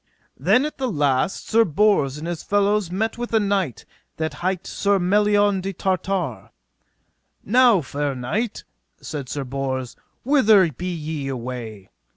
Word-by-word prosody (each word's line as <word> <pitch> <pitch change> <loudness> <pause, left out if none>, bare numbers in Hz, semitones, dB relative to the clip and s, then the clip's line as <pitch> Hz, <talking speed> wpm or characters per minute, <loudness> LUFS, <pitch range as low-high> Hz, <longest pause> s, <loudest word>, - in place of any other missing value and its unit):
Then 255 +3 +3
at 305 - -6
the 260 -2 -1
last 145 0 0
Sir 230 +1 +4
Bors 170 -7 +2
and 155 +3 -6
his 170 -2 -4
fellows 205 -2 +1
met 220 +6 -2
with 240 -1 -2
a - - +5
knight 195 - -1 0.3
that 160 -1 -2
hight 185 0 -1
Sir 200 0 +1
Melion 205 +1 +2
de 195 +1 -4
Tartare. 175 - -2 0.9
Now 240 -3 +5
fair 145 -1 -3
knight, 200 - -3 0.4
said 140 -5 -6
Sir 140 -1 -3
Bors, 130 -1 -4 0.3
whither 220 - +5
be 180 +7 -5
ye 155 -4 -4
away? 120 -6 -6
180 Hz, 145 wpm, -22 LUFS, 140-205 Hz, 0.9 s, a